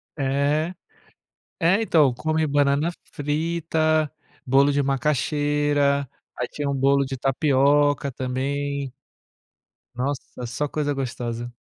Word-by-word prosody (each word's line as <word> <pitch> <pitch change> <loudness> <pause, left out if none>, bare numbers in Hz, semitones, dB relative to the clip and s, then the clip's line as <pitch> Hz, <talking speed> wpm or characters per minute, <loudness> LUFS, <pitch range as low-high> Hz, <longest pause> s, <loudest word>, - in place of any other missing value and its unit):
É, 145 +4 0 0.9
é 190 +7 +3
então 150 - +4
come 155 +3 0
banana 145 +3 +2 0.2
frita, 155 0 0 0.3
bolo 140 +2 +4
de 145 0 +2
macaxeira, 145 +1 +1 0.3
aí - - -2
tinha 145 -1 -4
um - - -1
bolo 140 +1 +3
de 135 0 -5
tapioca 140 +1 +2
também. 135 +2 -3 1.0
Nossa, 130 -1 -4
só 125 +5 -2
coisa 145 0 -1
gostosa. 120 -3 -4
140 Hz, 105 wpm, -24 LUFS, 135-150 Hz, 1.0 s, então